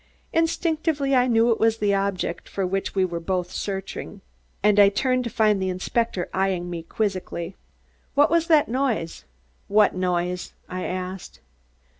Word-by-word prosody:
Instinctively 320 Hz, -3 st, +1 dB
I 250 Hz, -1 st, +4 dB
knew 230 Hz, 0 st, +4 dB
it 225 Hz, -, +1 dB
was 225 Hz, 0 st, +3 dB
the 205 Hz, -2 st, +1 dB
object 195 Hz, -3 st, -2 dB
for 195 Hz, -, -2 dB
which 195 Hz, +2 st, -2 dB
we 190 Hz, -1 st, +3 dB
were 170 Hz, -2 st, -4 dB
both 180 Hz, +1 st, -2 dB
searching, 195 Hz, 0 st, -5 dB, 0.4 s
and 210 Hz, 0 st, +4 dB
I 200 Hz, -1 st, +8 dB
turned 255 Hz, +4 st, +1 dB
to -, -, -2 dB
find 215 Hz, -2 st, +2 dB
the 190 Hz, -, 0 dB
inspector 185 Hz, +1 st, -1 dB
eying 185 Hz, -2 st, 0 dB
me 170 Hz, -1 st, -4 dB
quizzically. 185 Hz, -1 st, -3 dB, 0.6 s
"What 290 Hz, +2 st, +4 dB
was 335 Hz, -1 st, +2 dB
that 310 Hz, -3 st, +5 dB
noise?" 235 Hz, -, -2 dB, 0.4 s
"What 210 Hz, 0 st, +4 dB
noise?" 180 Hz, -1 st, -2 dB
I 185 Hz, 0 st, -4 dB
asked. 185 Hz, 0 st, -5 dB
200 Hz, 155 wpm, -24 LUFS, 185-235 Hz, 0.6 s, I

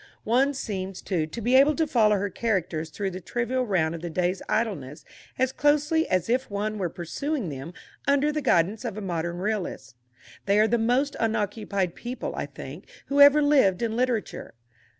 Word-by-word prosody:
One 265 Hz, +5 st, +2 dB
seems, 195 Hz, -6 st, -4 dB
too, 165 Hz, -5 st, -1 dB
to 160 Hz, +9 st, -7 dB
be 240 Hz, +4 st, +1 dB
able 280 Hz, +3 st, +6 dB
to 325 Hz, -, +1 dB
follow 220 Hz, -7 st, +3 dB
her 200 Hz, 0 st, -2 dB
characters 175 Hz, -8 st, -1 dB
through 195 Hz, +4 st, -3 dB
the 185 Hz, +1 st, -7 dB
trivial 240 Hz, +6 st, -2 dB
round 170 Hz, -6 st, +1 dB
of 165 Hz, -, -6 dB
the 175 Hz, -, -4 dB
day's 180 Hz, +3 st, -1 dB
idleness 175 Hz, -, -2 dB, 0.3 s
as 260 Hz, 0 st, +1 dB
closely 295 Hz, +3 st, +2 dB
as 185 Hz, -2 st, +1 dB
if 255 Hz, +3 st, 0 dB
one 210 Hz, +1 st, -3 dB
were 180 Hz, -3 st, -1 dB
pursuing 225 Hz, -, -3 dB
them 140 Hz, +3 st, -7 dB, 0.4 s
under 280 Hz, +1 st, +3 dB
the 305 Hz, 0 st, -2 dB
guidance 195 Hz, -, +2 dB
of 225 Hz, -4 st, -4 dB
a -, -, -4 dB
modern 170 Hz, -2 st, -3 dB
realist. 180 Hz, -, -3 dB, 0.5 s
They 200 Hz, +1 st, +4 dB
are 215 Hz, -, +5 dB
the 235 Hz, +1 st, +1 dB
most 255 Hz, +5 st, +1 dB
unoccupied 205 Hz, -4 st, -1 dB
people, 245 Hz, +1 st, -5 dB
I -, -, -3 dB
think, -, -, -10 dB, 0.2 s
who 285 Hz, +1 st, +3 dB
ever 285 Hz, +1 st, +8 dB
lived 260 Hz, -9 st, +3 dB
in 225 Hz, -1 st, -1 dB
literature. 245 Hz, -, -2 dB
215 Hz, 185 wpm, -26 LUFS, 180-255 Hz, 0.5 s, ever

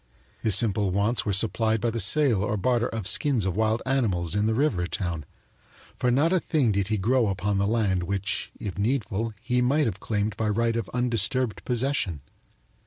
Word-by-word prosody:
His 110 Hz, -4 st, +2 dB
simple 105 Hz, -1 st, +1 dB
wants 105 Hz, +4 st, 0 dB
were -, -, +1 dB
supplied 110 Hz, +2 st, +1 dB
by 115 Hz, +2 st, -1 dB
the 115 Hz, -, -3 dB
sale 115 Hz, 0 st, +4 dB
or 105 Hz, 0 st, -1 dB
barter 120 Hz, +3 st, +1 dB
of 110 Hz, -4 st, -5 dB
skins 120 Hz, +1 st, +2 dB
of 95 Hz, -2 st, -1 dB
wild 110 Hz, +1 st, 0 dB
animals 100 Hz, -, 0 dB
in 105 Hz, +1 st, +1 dB
the 110 Hz, -, +1 dB
river 110 Hz, -10 st, 0 dB
town, 85 Hz, -5 st, -4 dB, 0.7 s
for 125 Hz, -, 0 dB
not 145 Hz, +8 st, +2 dB
a 185 Hz, -, +3 dB
thing 145 Hz, -9 st, +1 dB
did 100 Hz, -1 st, 0 dB
he 110 Hz, 0 st, 0 dB
grow 115 Hz, +4 st, +2 dB
upon 100 Hz, +1 st, -1 dB
the 100 Hz, -, +1 dB
land 105 Hz, -5 st, +1 dB
which, 100 Hz, +2 st, -3 dB
if 100 Hz, -2 st, -6 dB
needful, 110 Hz, -1 st, -1 dB
he 125 Hz, -1 st, +1 dB
might 140 Hz, +5 st, +2 dB
have 105 Hz, -4 st, -3 dB
claimed 105 Hz, -1 st, -2 dB
by 110 Hz, 0 st, 0 dB
right 115 Hz, +2 st, 0 dB
of 115 Hz, -, -3 dB
undisturbed 125 Hz, 0 st, 0 dB
possession. 120 Hz, -, -1 dB
110 Hz, 190 wpm, -25 LUFS, 100-125 Hz, 0.7 s, sale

